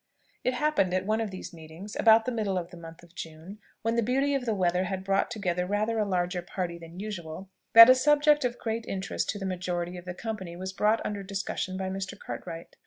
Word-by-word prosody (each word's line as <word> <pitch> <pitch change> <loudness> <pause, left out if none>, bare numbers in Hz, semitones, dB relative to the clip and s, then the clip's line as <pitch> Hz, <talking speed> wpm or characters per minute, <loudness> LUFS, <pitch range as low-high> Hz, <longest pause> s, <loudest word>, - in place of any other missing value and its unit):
It 255 - +1
happened 250 -11 +1
at 185 0 0
one 215 +2 +1
of 220 - -2
these 185 -1 -8
meetings, 165 +6 -10
about 225 0 +6
the 255 - -1
middle 210 -5 -1
of 175 -1 -4
the - - -10
month 165 0 -11
of 170 -1 -18
June, 165 +5 -9 0.2
when 225 +1 +1
the 235 - +3
beauty 270 +5 +1
of 270 -3 -1
the 220 - +1
weather 180 -1 +1
had 190 0 -3
brought 195 0 +1
together 180 -6 -1
rather 215 +3 0
a 210 - +2
larger 180 -1 0
party 175 -1 -4
than 170 +2 -11
usual, 190 -3 -6 0.2
that 230 0 +12
a 255 - +9
subject 295 +2 +4
of 245 -1 -1
great 225 0 -3
interest 195 0 -3
to 205 - -1
the 195 - -5
majority 180 -1 -3
of 175 - -10
the 180 0 -5
company 190 -5 -5
was 190 +2 -5
brought 215 +3 +2
under 205 -1 -3
discussion 195 -1 -3
by 190 0 -3
Mr. 190 0 -5
Cartwright. 165 -1 -8
195 Hz, 230 wpm, -28 LUFS, 180-225 Hz, 0.2 s, that